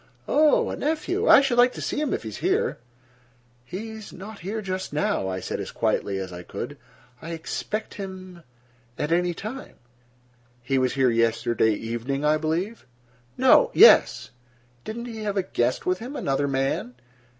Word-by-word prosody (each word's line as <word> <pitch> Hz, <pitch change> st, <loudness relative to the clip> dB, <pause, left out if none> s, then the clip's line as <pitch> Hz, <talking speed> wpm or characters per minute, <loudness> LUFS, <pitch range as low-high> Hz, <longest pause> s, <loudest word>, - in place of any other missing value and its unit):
"Oh, 300 Hz, 0 st, +3 dB
a -, -, -3 dB
nephew. 340 Hz, -, -1 dB
I -, -, +9 dB
should 250 Hz, -3 st, +1 dB
like 245 Hz, +1 st, +5 dB
to -, -, -7 dB
see -, -, -2 dB
him, 300 Hz, -, -1 dB
if -, -, -2 dB
he 110 Hz, -, -5 dB
is 105 Hz, -, -8 dB
here." -, -, 0 dB, 0.8 s
"He 195 Hz, -, -7 dB
is 220 Hz, -2 st, -9 dB
not 200 Hz, +3 st, -10 dB
here 200 Hz, +5 st, -4 dB
just 190 Hz, -2 st, -4 dB
now," 145 Hz, -9 st, 0 dB
I 95 Hz, 0 st, -3 dB
said -, -, -4 dB
as -, -, -5 dB
quietly 100 Hz, -1 st, -1 dB
as 95 Hz, -1 st, -5 dB
I 90 Hz, -, -7 dB
could. -, -, -6 dB, 0.5 s
"I 165 Hz, +1 st, -6 dB
expect 210 Hz, +6 st, -4 dB
him—at 150 Hz, -, -9 dB
any 175 Hz, 0 st, +1 dB
time." 235 Hz, +9 st, -7 dB, 0.9 s
"He 135 Hz, +2 st, +1 dB
was 130 Hz, 0 st, 0 dB
here 130 Hz, -2 st, +3 dB
yesterday 115 Hz, -1 st, +2 dB
evening, 120 Hz, +6 st, -3 dB
I 155 Hz, +1 st, +4 dB
believe?" 165 Hz, -, -3 dB, 0.5 s
"No—yes." -, -, +6 dB, 0.5 s
"Didn't 235 Hz, +2 st, -5 dB
he 225 Hz, -2 st, -7 dB
have 205 Hz, -1 st, -2 dB
a 195 Hz, -, +2 dB
guest 125 Hz, -8 st, -1 dB
with 185 Hz, 0 st, 0 dB
him? 255 Hz, +5 st, -7 dB
Another 140 Hz, -, 0 dB
man?" 135 Hz, -2 st, -1 dB
170 Hz, 165 wpm, -25 LUFS, -, 0.9 s, I